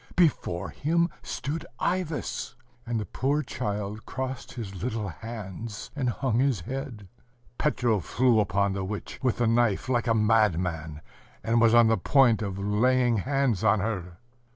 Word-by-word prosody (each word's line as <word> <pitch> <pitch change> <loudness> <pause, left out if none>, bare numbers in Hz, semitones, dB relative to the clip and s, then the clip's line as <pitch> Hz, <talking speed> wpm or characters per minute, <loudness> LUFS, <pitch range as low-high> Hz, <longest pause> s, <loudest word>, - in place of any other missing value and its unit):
before 150 - +1
him 170 +3 +1
stood 150 +3 -4 0.2
Ivas. 165 - -2 0.3
And 115 -1 -1
the 105 - -3
poor 140 - 0
child 105 -4 -4
crossed 130 -1 -5
his 100 -6 -7
little 110 -4 -2
hands, 110 +1 -7
and 130 -4 0
hung 120 -1 0
his 130 -7 +2
head.... 125 - -6 0.5
Petro 120 -8 +1
flew 120 +5 +2
upon 100 0 +1
the 95 0 -3
witch 100 +2 -6
with 130 -4 +1
the 120 - +1
knife 115 0 +2
like 120 -1 +1
a 115 - +3
madman, 90 -8 +1 0.4
and 115 +1 +2
was 115 0 +5
on 120 0 +7
the 110 0 +3
point 130 -6 +4
of 100 -3 -3
laying 120 +4 +2
hands 135 -2 0
on 110 - +4
her. 95 -5 -3
115 Hz, 155 wpm, -27 LUFS, 100-130 Hz, 0.5 s, on